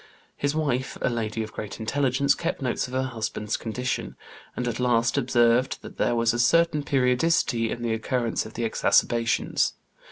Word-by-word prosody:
His 145 +1 -1
wife, 135 -5 -1
a - - +1
lady 110 -1 -2
of 110 - -9
great 105 - -6
intelligence, 140 +3 +1
kept 170 +3 -3
notes 130 -2 -1
of 125 - -11
her 130 - +1
husband's 110 -3 -3
condition, 125 +3 -3 0.4
and 125 - -2
at 120 0 -3
last 120 -1 +2
observed 125 -1 +2
that - - -10
there 120 - +1
was 115 0 +2
a 120 - -2
certain 165 +4 +3
periodicity 125 -3 +1
in 120 - -4
the 115 -1 0
occurrence 115 +1 -1
of 110 - -11
the 120 - -2
exacerbations. 115 +1 +2
120 Hz, 170 wpm, -25 LUFS, 115-130 Hz, 0.4 s, certain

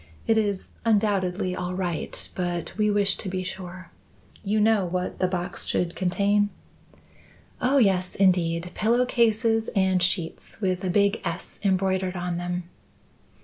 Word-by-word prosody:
It 225 - +3
is 205 -3 -1
undoubtedly 200 -4 +1
all 180 0 -3
right, 175 -3 -3
but 175 -2 -3
we 210 0 +2
wish 200 -1 +3
to 195 - -5
be 185 0 -2
sure. 185 -1 -7 0.5
You 210 +1 +1
know 215 -1 +4
what 180 0 -3
the 185 - +2
box 180 -1 -3
should 175 -1 -1
contain?" 200 +3 +2 1.1
"Oh, 260 +3 +3
yes, 190 -6 +2
indeed; 175 -2 +2
pillow 235 +3 +2
cases 225 -2 +2
and 190 -2 +3
sheets, 175 -2 -2
with 185 -3 -1
a 185 - 0
big 200 +3 +2
S 170 +1 -5
embroidered 190 -1 +1
on 175 -1 -2
them." 175 0 -3
190 Hz, 145 wpm, -25 LUFS, 180-205 Hz, 1.1 s, know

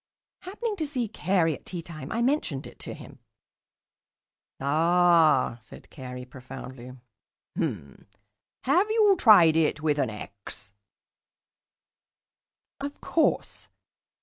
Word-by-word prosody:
Happening 415 +4 -4
to 315 -4 -2
see 255 -5 -2
Carey 180 -5 +1
at - - -10
teatime, 165 -5 -7
I 230 +1 0
mentioned 245 - 0
it - - -13
to - - -7
him. - - -13 1.4
"Ah," 160 -3 +3
said 110 - -15
Carey 125 -2 -8
profoundly. 130 0 -10 0.6
"H'm. 70 -1 -4 0.6
Have 350 +11 +3
you 430 -3 +4
tried 175 -9 +7
it 155 -1 +1
with 150 -2 +1
an 130 - +1
'x'?" 100 -1 -8 2.1
"Of 285 +1 -6
course." 325 - 0
165 Hz, 105 wpm, -27 LUFS, -, 2.1 s, tried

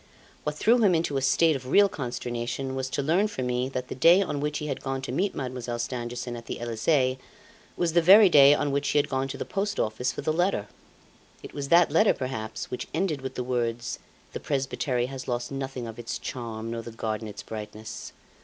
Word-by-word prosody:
What 150 0 -1
threw 230 +9 +4
him 200 -6 +4
into 160 -3 0
a - - 0
state 155 +4 +3
of 130 -1 -6
real 200 +9 +6
consternation 125 -3 -4
was 130 0 -3
to 140 - -2
learn 175 +8 +2
from 130 -12 -4
me 125 +1 -1
that 125 -1 -4
the - - -5
day 170 +8 +6
on 180 -7 -1
which 150 +1 -1
he 150 - -4
had 140 -3 -3
gone 135 -1 -3
to 125 - -4
meet 185 +10 0
Mademoiselle 125 -3 -4
Stangerson 120 0 -4
at 115 0 -9
the - - -5
Elysee, 130 +3 +1 0.6
was 170 -2 0
the 170 - +5
very 200 +5 +8
day 145 -4 +7
on 145 -1 -1
which 140 +1 0
she - - +1
had 145 0 +3
gone 135 0 -1
to 135 - -6
the - - -4
Post 200 +1 -2
Office 115 +4 0
for - - -6
the 155 - 0
letter. 175 - 0 0.8
It - - -10
was 140 -1 -4
that 170 -2 +5
letter, 160 - +4
perhaps, 125 -5 -5
which 125 - -4
ended 160 -5 0
with 130 - -6
the 125 - -2
words: 120 -2 -2 0.3
'The - - -4
presbytery 135 -3 -1
has 130 0 -7
lost 120 0 -2
nothing 135 -2 -4
of 115 +1 -8
its 120 +1 -4
charm, 115 -2 -5
nor 115 0 -3
the 115 - -8
garden 110 -1 -3
its 105 -1 -8
brightness. 110 0 -7
130 Hz, 220 wpm, -27 LUFS, 120-150 Hz, 0.8 s, very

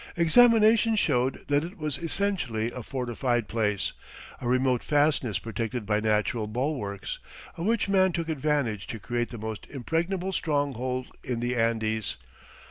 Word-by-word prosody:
Examination 225 +4 +6
showed 130 - +1
that 145 +1 +2
it 180 +5 -7
was 150 -4 -2
essentially 165 - -1
a 125 - -6
fortified 120 -1 -1
place, 105 -3 0 0.5
a 120 - -3
remote 130 0 +2
fastness 145 - +2
protected 115 +2 -4
by 105 0 +1
natural 110 +1 +1
bulwarks, 110 -4 -3 0.4
of 170 - -3
which 230 -3 +2
man 190 -1 +4
took 165 -1 -2
advantage 145 -9 -1
to 115 - -5
create 120 +2 -2
the 120 - -7
most 110 0 -6
impregnable 170 +8 -2
stronghold 130 -6 -1
in 125 -2 -2
the 120 +1 -1
Andes. 110 -2 0
130 Hz, 140 wpm, -27 LUFS, 115-165 Hz, 0.5 s, Examination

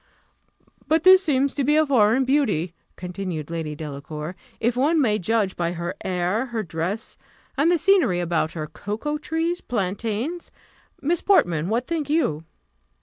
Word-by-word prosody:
"But 320 0 +2
this 375 0 +8
seems 280 -4 +1
to 280 - -1
be 295 +3 +3
foreign 255 -1 +3
beauty," 220 - +1 0.2
continued 180 -4 -5
Lady 160 -3 -4
Delacour, 150 +2 -6 0.2
"if 235 +1 +1
one 300 +6 +2
may 215 -6 +2
judge 210 0 0
by 170 0 -1
her 170 +1 -4
air, 185 +7 -1
her 230 -3 -3
dress, 175 +5 -4 0.4
and 290 +4 +3
the 350 - +4
scenery 320 - +3
about 170 -2 0
her 155 -3 -4
cocoa 220 - -4
trees, 325 +3 -2
plantains: 225 - -3 0.5
Miss 335 +4 +1
Portman, 175 - +2
what 235 +3 0
think 310 -2 -3
you?" 165 - 0
220 Hz, 145 wpm, -23 LUFS, -, 0.5 s, this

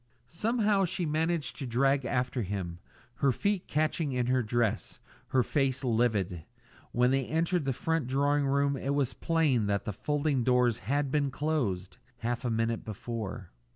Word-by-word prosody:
Somehow 210 - +1
she 180 0 -2
managed 160 +1 -1
to 135 - -4
drag 135 +3 +2
after 125 +1 0
him, 90 -4 -4 0.4
her 140 - +3
feet 200 - -1
catching 155 -1 0
in 125 -1 +1
her 130 +1 +2
dress, 115 -1 -1 0.3
her 130 -1 +2
face 135 0 0
livid. 110 -8 +1 0.5
When 125 +1 +3
they 135 -1 +1
entered 165 +1 0
the 135 - +1
front 160 +1 -1
drawing 140 +2 +2
room 140 +1 +2
it 135 +1 -1
was 135 -3 +1
plain 150 -10 +1
that 100 -1 0
the 105 - -3
folding 145 +2 0
doors 125 -2 +3
had 140 +6 -1
been 145 -1 +1
closed 130 -11 -2 0.2
half 120 0 -2
a 125 - 0
minute 115 0 0
before. 110 -3 -5
130 Hz, 160 wpm, -30 LUFS, 115-150 Hz, 0.5 s, her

